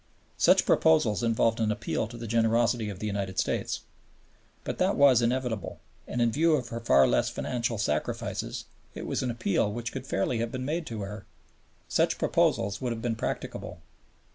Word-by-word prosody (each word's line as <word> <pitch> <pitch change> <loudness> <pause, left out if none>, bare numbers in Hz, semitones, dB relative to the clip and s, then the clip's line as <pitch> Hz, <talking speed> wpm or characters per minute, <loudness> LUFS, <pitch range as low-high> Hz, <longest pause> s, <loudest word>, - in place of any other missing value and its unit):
Such - - +5
proposals 100 +7 +3
involved 115 -1 +2
an 110 -1 +1
appeal 105 - -2
to 120 +2 -10
the 115 - -6
generosity 115 0 +2
of 100 - -6
the 105 - -5
United 100 -2 -3
States. - - -1 0.8
But - - -4
that - - +2
was 135 -4 +6
inevitable; 120 -3 -1 0.3
and, 125 - -3
in 115 - +2
view 160 +5 +3
of 125 -5 -3
her 115 - -4
far 90 -12 +5
less - - +2
financial 120 -2 -2
sacrifices, 75 -6 -2 0.3
it - - -6
was - - -1
an 130 - -1
appeal 110 -3 0
which 120 +2 -4
could 130 0 -6
fairly 115 +3 0
have 115 0 -2
been 130 0 -4
made 160 +3 -2
to 110 -3 -5
her. 100 +1 -7 0.6
Such - - +1
proposals 100 +1 +1
would 125 -2 -1
have 115 -1 -4
been 120 -2 0
practicable. - - -5
115 Hz, 180 wpm, -28 LUFS, 105-120 Hz, 0.8 s, was